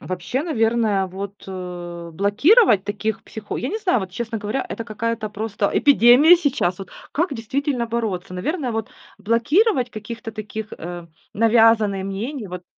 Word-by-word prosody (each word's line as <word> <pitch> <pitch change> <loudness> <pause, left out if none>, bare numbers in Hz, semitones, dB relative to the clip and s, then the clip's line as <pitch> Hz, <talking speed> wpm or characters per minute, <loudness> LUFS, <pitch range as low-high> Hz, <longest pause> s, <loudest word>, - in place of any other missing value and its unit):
Вообще, 185 - -3
наверное, 225 - +1
вот, 195 +2 -8
э, 175 -2 -7
блокировать 210 - +4
таких 210 +1 -3
психо 215 -1 -7
я 255 - -3
не 435 - -3
знаю 365 - +1
вот, 190 -1 -6
честно 225 +3 -4
говоря, 215 +5 -3
это 230 - -5
какая-то 220 0 -3
просто 210 -1 -2
эпидемия 285 +5 +6
сейчас. 270 - 0
Вот 195 - -9 0.2
как 325 0 0
действительно 250 +1 -2
бороться? 215 -6 -3
Наверное, 260 - -2
вот 220 -1 -3 0.3
блокировать 245 - +2
каких-то 225 +1 -7
таких, 215 0 -6
э, 175 0 -7 0.3
навязанные 220 -3 +3
мнений, 215 +5 -4
вот 180 0 -8
220 Hz, 145 wpm, -21 LUFS, 195-245 Hz, 0.3 s, эпидемия